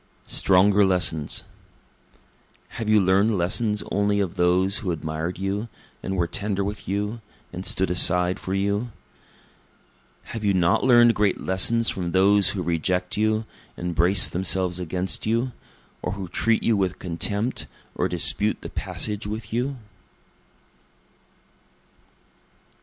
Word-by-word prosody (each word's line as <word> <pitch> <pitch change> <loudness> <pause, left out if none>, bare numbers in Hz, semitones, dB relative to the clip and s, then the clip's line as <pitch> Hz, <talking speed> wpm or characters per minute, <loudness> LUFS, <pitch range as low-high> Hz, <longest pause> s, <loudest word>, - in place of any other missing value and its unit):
Stronger 100 +2 +3
Lessons 90 -5 +1 1.3
Have 115 -2 -5
you 110 0 +5
learn'd 100 +3 +2
lessons 105 +4 0
only 100 0 +1
of 95 -4 -1
those 90 +2 +2
who 100 - -4
admired 80 +1 -4
you, 100 +4 -3 0.3
and 95 0 -4
were 85 - +1
tender 100 +3 -2
with 100 +1 -6
you, 105 +4 -3 0.3
and 90 +1 -5
stood 95 -2 +1
aside 90 +1 +3
for 95 - -4
you? 100 +4 -1 1.4
Have 115 - -5
you 100 -2 +2
not 85 -2 +2
learn'd 120 -2 +6
great 105 -3 0
lessons 115 +5 +1
from 90 -2 -4
those 100 +1 +5
who 95 -3 -2
reject 90 +2 -1
you, 110 +1 0 0.3
and 90 0 -4
brace 90 +4 +5
themselves 90 0 0
against 90 +2 -3
you? 115 +3 0 0.5
or 90 - -3
who 100 -2 -6
treat 115 +6 0
you 115 - +2
with 95 -2 -1
contempt, 100 +6 -2 0.3
or - - -1
dispute - - +1
the - - -8
passage 105 -1 -2
with 110 0 -6
you? 130 +4 -1
95 Hz, 130 wpm, -24 LUFS, 90-105 Hz, 1.4 s, learn'd